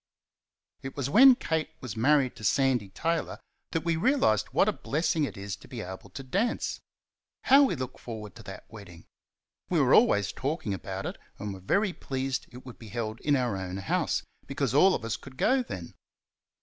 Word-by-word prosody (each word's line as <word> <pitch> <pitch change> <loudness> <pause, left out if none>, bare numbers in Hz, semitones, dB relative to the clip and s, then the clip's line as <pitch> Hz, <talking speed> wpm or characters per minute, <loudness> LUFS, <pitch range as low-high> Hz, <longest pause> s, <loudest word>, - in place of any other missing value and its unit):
It 135 +1 -8
was 140 0 -2
when 260 - +9
Kate 160 -8 -2
was 125 -5 -6
married 130 +2 +3
to - - -11
Sandy 125 -2 +2
Taylor 165 - -2 0.3
that 165 - -2
we 170 -1 +2
realised 160 - +2
what 165 +9 +2
a 215 - +2
blessing 160 -1 0
it - - -7
is 100 -1 -5
to - - -16
be 120 -3 -6
able 95 -1 -8
to 135 - -8
dance. 200 - -1 0.6
How 275 +2 +7
we 255 - 0
looked 130 -2 -6
forward 110 -3 -7
to - - -10
that 95 - -9
wedding! 95 -6 -12 0.6
We - - +2
were - - +4
always 100 -3 +4
talking 135 - -3
about 95 0 -5
it, - - -5 0.2
and 100 0 -5
were 95 - -9
very 195 - +1
pleased 135 -3 -3
it 125 +1 -12
would 125 - -11
be 115 - -11
held 110 0 -4
in 145 -1 +2
our 125 -6 0
own 95 -1 -4
house, 95 - 0 0.2
because - - -1
all 185 +7 +6
of - - -5
us 115 - -2
could 130 -1 -13
go 265 - +3
then. 90 - -7
130 Hz, 195 wpm, -28 LUFS, 105-160 Hz, 0.6 s, when